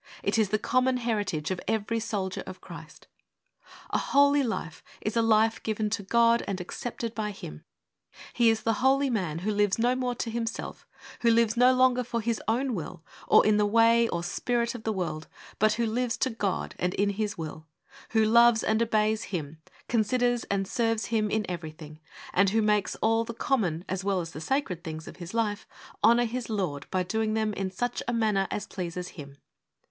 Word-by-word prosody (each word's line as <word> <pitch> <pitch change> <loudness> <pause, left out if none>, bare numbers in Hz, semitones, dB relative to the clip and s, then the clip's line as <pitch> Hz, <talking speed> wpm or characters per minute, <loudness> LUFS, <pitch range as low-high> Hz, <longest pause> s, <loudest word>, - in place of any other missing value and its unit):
It 205 +3 +1
is 215 -3 +2
the 215 - +2
common 255 +3 +1
heritage 205 -10 -2
of 185 - -3
every 225 +1 0
Soldier 205 -4 -3
of 185 - -8
Christ. - - -12 0.9
A - - +1
holy 285 +1 +4
life 225 - -3 0.2
is 215 - -3
a 230 - +4
life 225 0 +3
given 215 -1 -2
to 225 -1 -1
God 235 +3 +3
and 195 -1 -2
accepted 230 +5 -5
by 215 -2 -2
Him. 75 - -9 0.7
He 235 -2 +4
is 225 -1 0
the 225 - +2
holy 270 +1 +3
man 180 -9 -1
who 215 - +1
lives 205 -1 +2
no 240 +2 +2
more 250 -1 -1
to 230 - -3
himself; 230 0 -5 0.3
who 235 - +3
lives 230 -1 +3
no 250 +2 +6
longer 255 -1 +3
for 235 0 -3
his 230 0 -1
own 250 +3 +1
will, 175 -2 -6 0.2
or - - +6
in 210 0 +4
the 210 - +3
way 230 +2 +4
or 170 0 -2
spirit 235 +6 -1
of 240 -3 -9
the 220 - +1
world, 170 -6 -3 0.3
but 215 0 +4
who 235 +1 0
lives 235 +1 -1
to 260 +2 0
God 205 -4 -2
and 180 0 -1
in 200 +1 +1
His 205 0 -3
will; 155 -1 -7 0.4
who 220 -1 +3
loves 235 0 +5
and 220 +1 +1
obeys 220 -1 +1
Him, 160 -4 -5 0.3
considers 245 +2 +1
and 195 -1 -1
serves 225 -1 0
Him 215 -2 +2
in 215 0 0
everything, 155 -3 -7 0.3
and 195 +1 +4
who 220 +2 +2
makes 210 -2 +1
all 225 +1 +3
the 230 0 -7
common, 190 - 0
as 190 0 -3
well 195 -1 +1
as 165 -2 -5
the 155 - -8
sacred, 185 - -1
things 160 -2 -7
of - - -10
his 180 +3 -8
life 210 -3 -1 0.4
honour 240 +1 +5
his 240 +1 -4
Lord 180 -10 -2
by 185 -1 0
doing 215 +3 -1
them 215 -1 0
in 195 -1 -2
such 245 +7 -3
a 240 - 0
manner 210 -4 +1
as 210 - -3
pleases 180 -1 -5
Him. 140 -3 -11
220 Hz, 200 wpm, -27 LUFS, 190-235 Hz, 0.9 s, no